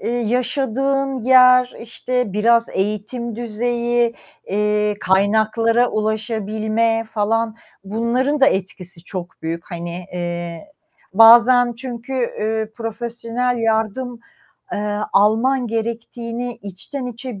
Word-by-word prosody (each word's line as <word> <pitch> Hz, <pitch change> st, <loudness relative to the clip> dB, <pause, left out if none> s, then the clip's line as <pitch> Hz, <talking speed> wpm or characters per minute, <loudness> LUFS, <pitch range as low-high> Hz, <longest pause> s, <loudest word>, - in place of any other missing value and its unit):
eee, -, -, -3 dB
yaşadığın 265 Hz, +3 st, 0 dB
yer, 255 Hz, 0 st, +6 dB
işte 245 Hz, -1 st, -3 dB
biraz 230 Hz, +2 st, +3 dB
eğitim 215 Hz, +4 st, -3 dB
düzeyi, 240 Hz, +1 st, 0 dB, 0.3 s
eee, 210 Hz, +1 st, +1 dB
kaynaklara 220 Hz, +5 st, +2 dB
ulaşabilme 220 Hz, +1 st, -1 dB
falan, 220 Hz, +1 st, 0 dB, 0.3 s
bunların 235 Hz, +8 st, 0 dB
da 270 Hz, -, +6 dB
etkisi 185 Hz, -6 st, -2 dB
çok 180 Hz, -2 st, -7 dB
büyük, 165 Hz, +3 st, -5 dB
hani, 175 Hz, +1 st, -6 dB
eee, 175 Hz, -, -5 dB, 0.4 s
bazen 240 Hz, +3 st, +7 dB
çünkü, 245 Hz, +1 st, -7 dB
üüü, 220 Hz, -3 st, -2 dB
profesyonel 235 Hz, +2 st, -3 dB
yardım, 225 Hz, +2 st, -1 dB, 0.5 s
eee, 205 Hz, 0 st, -2 dB
alman 230 Hz, +6 st, +3 dB
gerektiğini 235 Hz, +1 st, -4 dB
içten 205 Hz, +8 st, -6 dB
içe 245 Hz, -3 st, -7 dB
230 Hz, 95 wpm, -20 LUFS, 210-245 Hz, 0.5 s, bazen